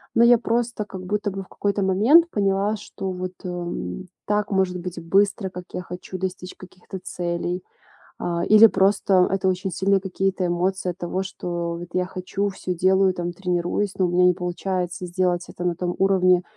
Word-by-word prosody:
Но 230 - +6
я 240 0 +7
просто 235 -1 -1
как 190 -2 -8
будто 205 +2 -1
бы 195 0 -5
в - - -19
какой-то 200 0 -1
момент 230 - +5
поняла, 200 +1 +1
что 195 -2 -6
вот, 185 0 -5
эм, 175 - -5 0.2
так 210 0 0
может 190 -2 +1
быть 175 -1 -6
быстро, 195 +2 +2
как 180 -1 -8
я - - -3
хочу 180 +1 -7
достичь 185 0 -5
каких-то 185 0 -10
целей. 175 +1 -3 0.6
А, 170 0 -1
или 215 +1 +8
просто 195 -2 +3
это 195 -1 0
очень 185 0 -2
сильные 195 +3 +2
какие-то 190 0 -1
эмоции 180 +2 0
от 175 - -13
того, 185 +2 -2
что 175 -2 -4
вот 175 +1 -7
я 180 0 +1
хочу, 190 +2 -3
всё 185 -1 -4
делаю, 190 +2 +3
там, 175 -1 -4
тренируюсь, 180 +2 -1
но 185 - +3
у 175 - 0
меня 180 +1 +4
не 180 - +5
получается 180 0 -3
сделать 175 0 0
это 175 - -7
на 175 - +1
том 175 0 -2
уровне, 185 -2 +4
185 Hz, 185 wpm, -23 LUFS, 180-195 Hz, 0.6 s, или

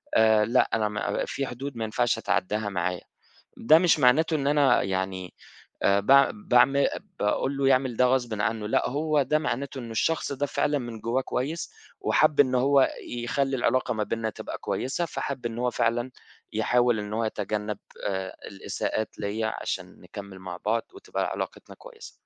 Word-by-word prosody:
آآ 110 -1 +5
لأ، 115 - +2
أنا 110 -1 +1
ما 105 0 -2
في 135 - -3
حدود 130 +1 -6
ما 115 - -2
ينفعش 120 +2 0
أتعدّاها 100 +4 -1
معاه. 90 -1 -2 0.6
ده 155 +7 +6
مش 170 -2 +3
معناته 150 +5 +4
إن 140 -2 -2
أنا 145 -1 +4
يعني 95 -1 -3 0.5
آآ 100 0 +4
باع 135 +6 +6
باعم 135 - +4 0.5
باقول 130 +6 0
له 135 -1 +2
يعمل 130 -2 +2
ده 125 - +4
غصبٍ 120 -4 0
عنّه، 110 -1 -1
لأ - - +1
هو 150 +2 +1
ده 150 +3 +1
معناته 140 -2 -3
إنّه 120 -3 -7
الشخص 160 +6 0
ده 140 +1 -1
فعلًا 145 +1 0
من 120 -4 -7
جوّاه 115 +4 0
كويّس 150 - -3 0.3
وحَب 145 - +3
إنّه 130 -2 +4
هو 135 0 +4 0.2
يخلّي 135 +3 -1
العلاقة 130 0 +1
ما 110 - -1
بيننا 115 0 -2
تبقى - - -7
كويّسة، 135 +7 -2
فحَب 140 -5 -4
إنّه 120 +1 -3
هو 125 - +1
فعلًا 120 +1 0 0.4
يحاول 120 +1 +2
إن 105 0 -6
هو 115 +1 0
يتجنَّب 105 -1 -3 0.3
آآ 95 -1 -3
الإساءات 105 +2 -4
ليّا 110 +2 -2
عشان - - -5
نكمّل 100 -2 -10
مع 95 -1 -7
بعض 115 +2 +1
وتبقى 390 - -3
علاقتنا - - -6
كويسة. - - -12
120 Hz, 170 wpm, -26 LUFS, 105-140 Hz, 0.6 s, ده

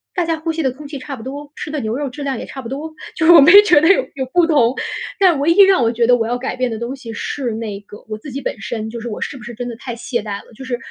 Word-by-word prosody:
大 355 -3 +1
家 325 -1 -1
呼 325 +1 -2
吸 325 - -2
的 270 - +1
空 285 +3 -11
气 280 -2 -7
差 275 +1 -6
不 225 - -11
多， 285 +3 -7
吃 300 - -6
的 300 - -2
牛 220 -2 -2
肉 290 0 -2
质 275 +3 -8
量 270 -4 -2
也 - - -6
差 265 - -8
不 230 - -8
多， 305 +4 -6 0.2
就 320 - 0
是 345 - +8
我 330 - +9
没 300 +5 +7
觉 350 -8 +5
得 320 - +4
有 395 +6 +5
有 265 -1 -3
不 350 -1 +4
同。 270 -7 +3 0.4
但 360 -7 +4
唯 290 +4 +1
一 360 - +6
让 385 -8 +4
我 230 - +2
觉 235 0 +1
得 245 +1 +5
我 225 -1 -1
要 245 +1 -1
改 255 - -4
变 255 -1 -1
的 225 - -4
东 235 +4 -4
西 255 -4 -9
是 250 +3 -3
那 215 -3 -5
个 205 +1 -14
我 215 - -4
自 280 +4 -9
己 275 - -4
本 215 - -4
身， 220 +1 -4
就 235 - -6
是 240 - -5
我 210 - -6
是 275 - -4
不 230 - -12
是 235 +1 -8
真 245 +2 -5
的 235 - -6
太 245 -1 -6
懈 240 +1 -3
怠 205 -1 -5
了， - - -19
就 245 - -11
是 255 -2 -3
265 Hz, 365 characters per minute, -18 LUFS, 235-300 Hz, 0.4 s, 我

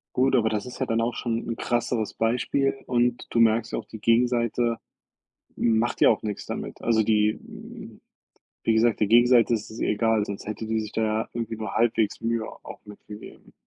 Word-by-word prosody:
Gut, 130 +1 +3
aber 110 -3 +3
das 105 -2 -2
ist 125 - -9
ja - - 0
dann 115 0 0
auch 120 +1 -1
schon 115 -1 -3
'n 115 - -2
krasseres 120 -2 -1
Beispiel 125 +4 0
und 120 -1 0
du 115 - 0
merkst 115 0 +3
ja - - 0
auch, 110 - -9
die 110 - -10
Gegenseite 115 0 +1 0.8
macht 115 +1 +1
ja - - +7
auch 110 - 0
nix 105 -2 -5
damit. - - -6
Also, 115 -1 +3
die 105 0 +2
hm, - - -11 0.6
wie 115 - +2
gesagt, 115 0 +2
die 105 - +3
Gegenseite 120 +1 +5
ist 110 - -4
es 110 - -9
egal, 110 0 +1
sonst 100 -1 -7
hätte 110 +1 -5
die 110 0 0
sich 110 -1 -7
da 110 - -1
ja 110 +1 -1
irgendwie 115 -1 -4
nur 110 -2 -5
halbwegs 115 -2 +1
Mühe 115 -1 -1 0.2
auch - - -10
mit 105 -1 -12
gegeben. 105 +1 -12
115 Hz, 200 wpm, -25 LUFS, 110-120 Hz, 0.8 s, ja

